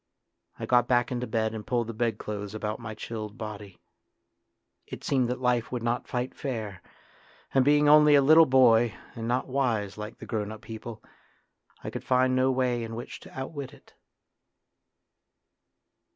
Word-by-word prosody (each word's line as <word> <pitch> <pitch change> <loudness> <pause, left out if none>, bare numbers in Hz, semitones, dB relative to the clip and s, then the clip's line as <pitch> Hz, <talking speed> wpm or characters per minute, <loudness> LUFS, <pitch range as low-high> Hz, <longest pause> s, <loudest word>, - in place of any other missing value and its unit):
I - - -5
got 125 -1 +3
back 120 0 +2
into 125 0 -2
bed 110 -1 -1
and 110 -2 -7
pulled 120 -2 0
the 115 - -6
bedclothes 105 -2 -3
about 110 0 -3
my 110 -2 -7
chilled 110 0 -6
body. 105 -4 -8 1.1
It - - -8
seemed 130 -3 +1
that 125 - -2
life 125 -2 0
would 125 -2 -3
not 120 +1 -1
fight 125 +1 -3
fair, 110 -9 -5 0.7
and 135 - +4
being 145 +2 +4
only 150 0 +7
a 140 - +6
little 160 +3 +7
boy 120 -5 +4 0.2
and 115 0 -5
not 125 +2 0
wise 115 -7 -1
like 105 0 -7
the - - -10
grown 105 -2 -3
up 110 - -9
people, 110 0 -8 0.8
I - - -5
could - - -6
find 130 0 +2
no 130 +1 +3
way 125 -2 0
in 115 0 -6
which 120 - -7
to - - -11
outwit 140 0 -6
it. - - -23
120 Hz, 165 wpm, -27 LUFS, 110-130 Hz, 1.1 s, only